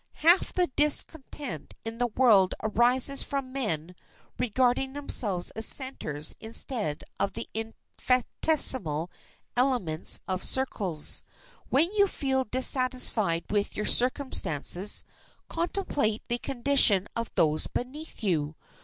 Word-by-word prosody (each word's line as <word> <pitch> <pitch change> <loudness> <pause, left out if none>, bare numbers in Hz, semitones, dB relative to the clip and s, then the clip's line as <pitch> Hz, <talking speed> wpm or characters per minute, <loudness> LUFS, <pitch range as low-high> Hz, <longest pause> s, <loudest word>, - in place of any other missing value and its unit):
Half 340 +4 +2
the 360 - +1
discontent 295 -1 +1
in 225 +1 -7
the 245 - 0
world 215 -5 +2
arises 245 +5 +3
from 270 -2 -4
men 180 - -3 0.5
regarding 250 +2 -1
themselves 215 -10 +1
as 220 0 +2
centers 155 - 0
instead 220 - -2 0.2
of 200 - -2
the - - -6
infinitesimal 225 - -2 0.4
elements 245 -11 +1
of 185 -1 -3
circles. 195 - +1 0.5
When 315 +7 +1
you 405 -1 +2
feel 265 -6 -1
dissatisfied 250 - +1
with 205 -1 -2
your 210 - -3
circumstances 210 - +2 0.4
contemplate 330 - -1
the 240 0 0
condition 240 -7 +3
of 230 -1 -4
those 155 -1 +1
beneath 275 +2 -7
you. 155 -6 -2
245 Hz, 110 wpm, -26 LUFS, 195-270 Hz, 0.5 s, arises